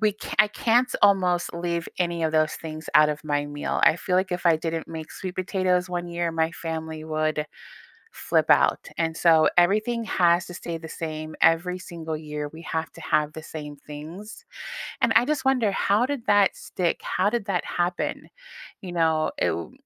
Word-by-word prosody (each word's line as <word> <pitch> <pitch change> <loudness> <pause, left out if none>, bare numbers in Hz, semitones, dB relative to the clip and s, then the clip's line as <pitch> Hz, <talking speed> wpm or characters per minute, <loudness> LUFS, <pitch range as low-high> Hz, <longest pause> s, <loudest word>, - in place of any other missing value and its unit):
we 215 -2 +3
ca - - -7
I 210 - +4
can't 240 +4 +2
almost 180 -4 +3
leave 170 -1 -2
any 170 -2 0
of 160 - 0
those 155 0 +2
things 155 -1 -8
out 150 0 +7
of 150 +1 -3
my 145 -1 -1
meal. 145 0 -3
I - - +6
feel 180 +1 -1
like 185 0 +1
if 180 0 -3
I 165 -2 +5
didn't 165 0 -4
make 160 -1 -7
sweet 185 -1 -6
potatoes 185 -1 0
1 175 -1 -3
year, 170 -1 -2
my 160 0 +1
family 160 -2 -5
would 155 -1 -1 0.7
flip - - +1
out, - - +3
and 165 -1 0
so, 165 -2 +5
everything 215 +7 +3
has 175 -3 +3
to - - -9
stay 170 -1 -5
the 160 0 -9
same. 155 -1 -6
Every 175 +3 +3
single 165 -3 -6
year, 150 -1 -5
we 160 - -11
have 160 -1 -3
to - - -12
have 150 0 +1
the 160 0 -8
same 150 -2 -8
things, 160 - -10 0.6
and - - +3
I 240 - +6
just 295 -1 -1
wonder, 250 -6 +3
how 205 +4 +2
did 275 -4 -4
that 205 -2 +4
stick? 175 -2 -2
How - - +1
did 230 -2 -2
that 185 -4 -1
happen? 175 0 -2 0.6
You 180 -2 -7
know, 160 -2 +2
it - - +2
w - - -3
170 Hz, 195 wpm, -25 LUFS, 160-185 Hz, 0.7 s, out